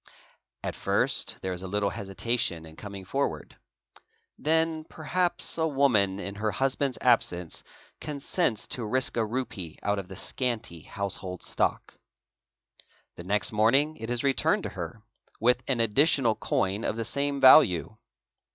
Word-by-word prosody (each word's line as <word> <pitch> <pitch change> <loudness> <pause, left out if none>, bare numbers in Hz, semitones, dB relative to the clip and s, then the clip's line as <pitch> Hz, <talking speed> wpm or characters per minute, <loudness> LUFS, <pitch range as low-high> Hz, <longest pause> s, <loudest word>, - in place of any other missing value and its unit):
At - - -2
first - - +2
there 95 -1 -2
is 90 - -6
a 95 - -6
little 100 +1 0
hesitation 95 -4 -2
in 80 0 -13
coming 100 -1 -8
forward. 95 - -2 0.8
'Then 160 0 +1
perhaps 175 +2 -1
a 160 - +2
woman 125 -10 +2
in 100 +1 -5
her 110 +2 -1
husband's 135 +2 0
absence 90 -8 +1 0.4
consents 140 - -1
to 125 - -2
risk 130 +4 0
a 115 - +2
rupee 105 -8 -4
out 100 0 0
of 95 - -7
the 95 - -9
scanty 115 - -2
house 100 +4 -3
hold 90 -1 -7
stock. - - -1 1.2
The 85 - -9
next 95 -1 +1
morning 135 +9 +3
it 115 +1 -6
is 120 +1 -1
returned 135 -1 +2
to - - -3
her - - -7 0.4
with 125 +2 +3
an 130 -3 0
additional 120 +2 +3
coin 100 0 -1
of - - -1
the 115 0 -3
same 140 +2 -1
value. 120 - +6
115 Hz, 150 wpm, -27 LUFS, 95-135 Hz, 1.2 s, value